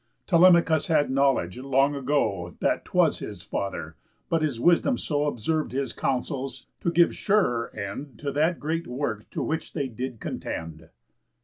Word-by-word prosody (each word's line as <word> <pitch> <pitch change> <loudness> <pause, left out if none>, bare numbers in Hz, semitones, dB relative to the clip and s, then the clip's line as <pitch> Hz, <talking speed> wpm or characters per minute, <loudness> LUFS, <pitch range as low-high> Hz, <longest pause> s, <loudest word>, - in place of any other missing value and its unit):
Telemachus 170 -3 +5
had 150 -4 +2
knowledge 135 -8 +1
long 135 +2 +2
ago 115 -11 -1
That - - 0
'twas - - +2
his - - -7
father, 100 - -4 0.3
but 165 -1 +1
his 145 -7 -1
wisdom 175 - +3
so 145 -1 -1
Observ'd 150 +2 -1
his 135 +1 -2
counsels, 135 +1 -3
to - - 0
give 170 0 +4
surer 155 - +1
end 120 +5 -6
To 140 +5 -3
that 160 +4 +1
great 165 +3 -2
work 125 -4 -3
to - - -3
which 160 0 -3
they 140 -4 -1
did 125 0 -5
contend." 80 -1 -6
140 Hz, 150 wpm, -26 LUFS, 125-160 Hz, 0.3 s, Telemachus